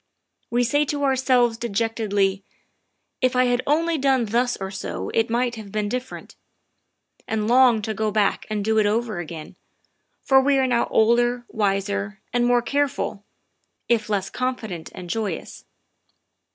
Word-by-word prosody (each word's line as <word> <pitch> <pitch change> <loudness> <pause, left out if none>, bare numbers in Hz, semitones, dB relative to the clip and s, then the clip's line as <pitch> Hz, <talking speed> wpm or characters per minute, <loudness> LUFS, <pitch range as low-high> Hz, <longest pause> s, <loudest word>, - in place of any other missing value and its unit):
We 240 +1 +2
say 290 +5 +2
to 285 0 -2
ourselves 255 -4 +2
de 235 - -3
jectedly, 205 -3 0 0.4
" - - -51
If 255 0 +2
I 255 - +4
had 245 0 +1
only 325 +2 +1
done 265 -3 +2
thus 240 +3 0
or 190 0 -5
so 195 - -5
it 225 0 +1
might 240 0 0
have 210 -3 -9
been 210 0 -1
different," 250 +3 -6 0.9
and 215 -1 -1
long 240 -2 +5
to 220 - -2
go 215 0 -1
back 210 -1 0
and 210 -2 -2
do 220 0 +2
it 210 - +3
over 220 -2 -1
again, 160 -2 -8 0.7
for 265 0 +5
we 275 +1 +3
are 265 - +3
now 245 -2 +1
older, 240 +2 +2
wiser, 200 -1 -1
and 240 0 +2
more 245 -1 +3
careful, 280 -7 -1 0.6
if 230 -2 +1
less 195 -2 -1
confident 225 -10 -4
and 180 - -8
joyous. 200 -2 -4
230 Hz, 160 wpm, -23 LUFS, 205-250 Hz, 0.9 s, long